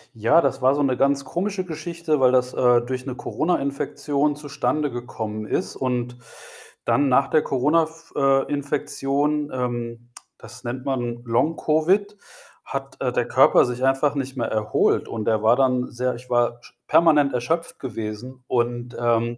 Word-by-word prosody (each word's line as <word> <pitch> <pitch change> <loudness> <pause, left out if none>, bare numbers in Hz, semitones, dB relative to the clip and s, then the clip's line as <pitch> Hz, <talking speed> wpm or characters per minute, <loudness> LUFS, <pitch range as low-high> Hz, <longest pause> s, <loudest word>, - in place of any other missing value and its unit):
Ja, 115 +10 +4
das 135 -1 -1
war 130 +2 +4
so 145 - 0
'ne 130 -3 +1
ganz 140 0 +2
komische 185 +4 -3
Geschichte, 165 -2 -2
weil 130 -1 +5
das, 125 0 +2
äh, 125 -1 +4
durch 130 +1 -5
'ne 130 -2 -5
Corona-Infektion 145 -1 -1
zustande 145 0 -2
gekommen 110 -3 -5
ist. - - -2
Und 125 -1 -2 0.7
dann 140 -1 +2
nach 135 +2 +4
der 155 - +2
Corona 150 +5 +2
f 165 +1 -10
äh, 135 -1 +3
Infektion, 145 +1 -1
ähm, 120 -1 -4 0.3
das - - -12
nennt 125 +2 -5
man 120 -3 -2
Long-Covid, 160 - +1 0.5
hat, 135 0 -6
äh, 125 -2 0
der 120 - -1
Körper 130 0 +5
sich 125 +1 -4
einfach 135 +2 +2
nicht 135 -1 -3
mehr 120 - -1
erholt. 110 -1 +1
Und 110 -2 -5
er 110 -1 +1
war 115 +2 +5
dann 125 -2 +1
sehr 125 0 -2
ich 125 +1 -13
war 120 -1 +1
sch - - -17
permanent 150 -5 +4
erschöpft 160 +8 -2
gewesen. 120 +1 -6
Und, 120 0 -1
ähm, 120 0 +1
130 Hz, 160 wpm, -23 LUFS, 120-145 Hz, 0.7 s, weil